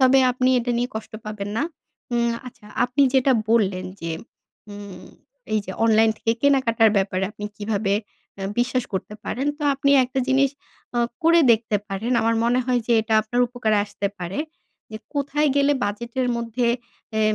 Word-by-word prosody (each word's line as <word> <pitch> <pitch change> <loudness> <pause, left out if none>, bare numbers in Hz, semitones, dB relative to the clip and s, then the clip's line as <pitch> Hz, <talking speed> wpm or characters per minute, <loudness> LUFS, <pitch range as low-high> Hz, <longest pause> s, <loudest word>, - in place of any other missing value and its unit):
তবে 265 +1 +6
আপনি 255 +1 +1
এটা 245 0 -2
নিয়ে 245 +1 0
কষ্ট 220 0 -6
পাবেন 210 -1 -5
না। - - +1 0.5
উম 235 0 +2
আচ্ছা 220 -4 -12 0.2
আপনি 250 +3 +1
যেটা 265 0 +4 0.2
বললেন 200 -5 +2 0.2
যে 165 0 -4 0.6
উম 200 -3 -9 0.5
এই 215 - +3
যে 190 - -5
অনলাইন 225 0 +5
থেকে 225 - +1
কেনাকাটার 240 -5 +4
ব্যাপারে 190 -1 +1
আপনি 210 -1 -8
কিভাবে 205 -1 -1 0.5
আ - - -4 0.2
বিশ্বাস 250 0 +1
করতে 190 +2 -4
পারেন, 270 +3 -2
তো 300 - -7
আপনি 280 +1 +1
একটা 255 +2 -4
জিনিস 270 +1 +3 0.5
আ - - +2 0.2
করে 335 +1 +6
দেখতে 220 -1 +1
পারেন। 205 +6 -2
আমার 230 +1 +2
মনে 245 +2 +3
হয় 250 -1 +1
যে 240 - +2
এটা 220 0 -1
আপনার 240 +3 -1
উপকারে 225 -3 0
আসতে 200 -1 -4
পারে। 180 +2 -5 0.5
যে - - -4 0.2
কোথায় 290 +1 +1
গেলে 280 +1 +4
বাজেটের 235 +5 -2
মধ্যে 235 +1 -1 0.5
এ - - +2
235 Hz, 170 wpm, -23 LUFS, 210-255 Hz, 0.6 s, তবে